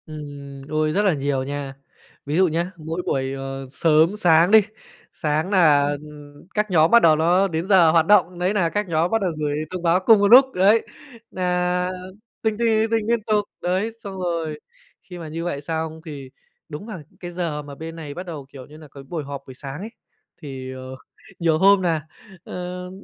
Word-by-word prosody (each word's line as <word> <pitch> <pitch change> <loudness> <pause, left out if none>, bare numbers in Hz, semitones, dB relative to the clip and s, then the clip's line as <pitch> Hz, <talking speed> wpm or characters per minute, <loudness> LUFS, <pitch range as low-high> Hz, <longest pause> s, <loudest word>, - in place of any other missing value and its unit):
Ừm, 145 -3 -9
ôi 155 0 0
rất 200 - +2
là 190 - +4
nhiều 140 -2 -1
nha. 140 0 -5 0.5
Ví 145 +3 -2
dụ 190 0 +5
nhá, 170 +3 -2
mỗi 160 +2 -4
buổi, 135 0 -1
ờ, 135 0 -6
sớm 160 +5 +3
sáng 170 -2 +4
đi, 220 0 +8 0.5
sáng 155 +1 -1
nà 150 -7 +4 0.6
các 210 -1 -1
nhóm 160 -2 +4
bắt 235 - +7
đầu 160 -5 +6
nó 175 +5 +3
đến 165 -1 -3
giờ 180 -5 +6
hoạt 165 -1 +4
động, 180 -2 +3
đấy 180 +3 +1
nà 185 -5 +1
các 210 +3 -2
nhóm 165 +1 0
bắt 225 - +1
đầu 185 -3 0
gửi 145 -1 -1
thông 180 -1 -5
báo 170 +1 +3
cùng 215 +3 +5
một 200 - +3
lúc, 250 +5 +9
đấy, 200 +5 +3 0.4
nà 180 0 0 0.5
tinh, 220 -2 0
tinh, 235 0 +1
tinh, 220 0 +2
tinh 225 -2 0
liên 235 -2 +1
tục, 210 -1 +1 0.2
đấy. 185 +5 0
Xong 200 -4 -8
rồi 165 -4 -3 0.4
khi 180 - -10
mà 165 -2 -7
như 165 +2 -5
vậy 155 -5 -3
xong 160 +1 -4
thì 140 -4 -8 0.4
đúng 150 +6 -7
và 200 -9 -8 0.2
cái 175 -1 -7
giờ 170 -4 -3
mà 145 -1 -10
bên 165 +2 -8
này 155 -3 -7
bắt 180 +5 -7
đầu, 155 -6 -7
kiểu 135 -2 -11
như 150 +1 -14
nà, 155 -1 -13
cái 140 - -11
buổi 155 +3 -5
họp 140 0 -7
buổi 130 - -9
sáng 135 +3 -8
ấy, 215 - -6 0.5
thì, 135 -3 -7
ờ, 130 0 -8 0.4
nhiều 165 -2 +2
hôm 195 +3 +5
nà, 160 -4 -1 0.4
ơ 180 0 -6
165 Hz, 205 wpm, -22 LUFS, 150-185 Hz, 0.6 s, lúc